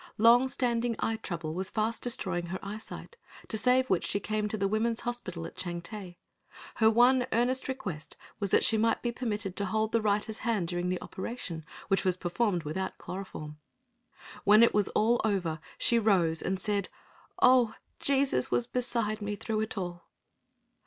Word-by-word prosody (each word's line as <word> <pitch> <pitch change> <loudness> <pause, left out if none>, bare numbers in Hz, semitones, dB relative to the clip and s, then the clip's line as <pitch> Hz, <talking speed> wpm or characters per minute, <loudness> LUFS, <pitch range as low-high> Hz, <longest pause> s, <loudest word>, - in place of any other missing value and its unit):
Long 235 +4 +6
standing 240 -2 0
eye 225 0 -1
trouble 165 -6 -4
was 190 +2 -2
fast 220 +1 -1
destroying 185 -7 -1
her 185 +2 -3
eyesight, 215 - -8 0.3
to - - -2
save 250 +4 +3
which 185 -6 +1
she 200 - 0
came 215 +1 -1
to 215 - -3
the 200 -1 +1
women's 225 +3 0
hospital 185 -9 -4
at - - -9
Changte. 180 +1 -6 0.6
Her 220 -1 +5
one 245 +3 +4
earnest 245 +3 +1
request 185 -12 -5 0.2
was 200 -2 -1
that - - +4
she 220 - +3
might 225 +1 +1
be 240 - 0
permitted 215 -6 -3
to 200 - 0
hold 220 +2 0
the 230 - +2
writer's 210 +1 0
hand 225 -8 0
during 175 +1 -2
the 180 - -1
operation, 185 -6 -6 0.2
which 195 -1 +2
was 185 -1 +1
performed 180 0 0
without 185 +5 -4
chloroform. 155 -5 -7 0.8
When 210 +3 +7
all - - +2
was 205 -2 +2
over, 205 -7 +1 0.2
she 235 - +3
rose 180 -7 +2
and 190 0 -1
said, 200 0 0 0.5
"Oh, 245 -3 +5 0.2
Jesus 275 - +2
was 120 -1 +2
beside 235 -4 -1
me 205 0 -2
through 215 +2 -2
it 220 0 -3
all." 175 -2 -5
210 Hz, 170 wpm, -30 LUFS, 185-230 Hz, 0.8 s, When